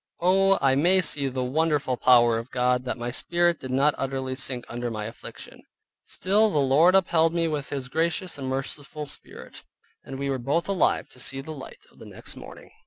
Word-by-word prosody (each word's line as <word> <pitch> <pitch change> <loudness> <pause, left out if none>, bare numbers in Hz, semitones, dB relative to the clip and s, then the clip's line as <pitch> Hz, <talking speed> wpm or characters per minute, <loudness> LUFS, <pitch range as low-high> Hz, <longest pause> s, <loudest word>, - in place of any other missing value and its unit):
Oh, 195 +2 +4
I 135 -1 +4
may 175 +8 +4
see 145 -5 0
the 130 -1 -2
wonderful 145 0 0
power 120 -2 +4
of 115 +2 -9
God, 125 0 +1
that 130 - -3
my 120 0 -4
Spirit 175 +5 0
did 130 - -8
not 140 +3 +3
utterly 135 -1 -3
sink 130 -2 -5
under 120 0 -4
my 105 -2 -4
affliction: 115 +2 -10 0.4
still 210 +4 +2
the 175 - -1
Lord 145 +7 +4
upheld 165 -3 +3
me 165 -1 +1
with 150 -3 -3
His 135 -2 -4
gracious 170 +5 -1
and 135 - -4
merciful 140 +3 -4
spirit, 140 - -10 0.4
and 135 - -8
we 140 +1 -3
were 135 - -2
both 140 +7 -1
alive 195 -5 +1
to 125 - -16
see 135 +1 -2
the 140 +4 -7
light 140 -4 -10
of - - -23
the - - -11
next - - -8
morning. - - -12
140 Hz, 200 wpm, -25 LUFS, 130-165 Hz, 0.4 s, Oh